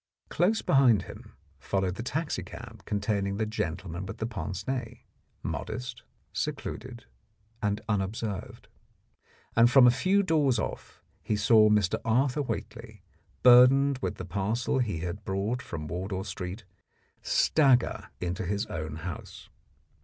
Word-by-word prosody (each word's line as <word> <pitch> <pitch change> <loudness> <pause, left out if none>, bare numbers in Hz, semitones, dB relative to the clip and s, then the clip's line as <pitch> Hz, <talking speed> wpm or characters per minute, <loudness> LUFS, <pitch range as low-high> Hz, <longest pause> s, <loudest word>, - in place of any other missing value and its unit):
Close 195 +7 +1
behind 125 -8 +4
him - - -12 0.2
followed 95 -2 -1
the 105 - -6
taxicab 150 +6 -5
containing 100 -1 -1
the 110 - 0
gentleman 90 -4 -4
with 95 - -7
pince 95 -2 -5
nez, 125 -3 -3 0.5
modest, 125 0 -5 0.3
secluded, 120 +1 -5 0.6
and 105 0 0
unobserved. 105 0 -3 0.9
And 115 +1 +6
from 130 0 +7
a 120 - +8
few 185 +11 +2
doors 150 -8 +2
off - - -5 0.2
he 105 - -1
saw 110 +1 +5
Mr. 105 -4 +2
Arthur 125 +5 +2
Whately, 115 -6 -6 0.4
burdened 130 +2 +7
with - - -2
the - - -7
parcel 105 +8 -1
he 105 -10 -1
had 90 +4 -5
brought 100 +6 -2
from 75 -3 -6
Wardour 95 +4 -3
Street, 95 +2 -6 0.6
stagger 135 -6 +2
into 90 0 -3
his 100 +3 -1
own 80 -2 -5
house. 80 0 -8
110 Hz, 125 wpm, -28 LUFS, 95-125 Hz, 0.9 s, a